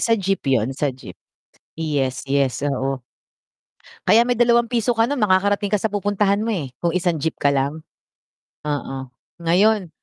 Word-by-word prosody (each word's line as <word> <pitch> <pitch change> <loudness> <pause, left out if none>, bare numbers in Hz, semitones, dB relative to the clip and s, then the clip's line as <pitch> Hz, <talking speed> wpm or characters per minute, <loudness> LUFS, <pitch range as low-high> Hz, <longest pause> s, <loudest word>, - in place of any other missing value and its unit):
sa 230 -1 +3
jeep 195 -1 -1
yun, 130 0 +1
sa 145 +2 -1
jeep. 90 -8 -12 0.6
Yes, 145 -5 -1
yes, 140 -2 +1
oo. 135 -2 -1 1.1
Kaya 225 +4 +6
may 245 0 +1
₱2 235 0 +2
ka 225 - +4
makakarating 205 -5 +1
ka 210 - +2
sa 215 +1 -2
pupuntahan 205 0 +1
mo 230 - -1
eh, 150 - -3
kung 170 - +1
1 175 -4 0
jeep 160 +1 -2
ka 140 0 +2
lang? 140 +3 -1 0.8
Oo, 135 -3 -4 0.3
ngayon 190 +3 +3
180 Hz, 150 wpm, -21 LUFS, 140-215 Hz, 1.1 s, Kaya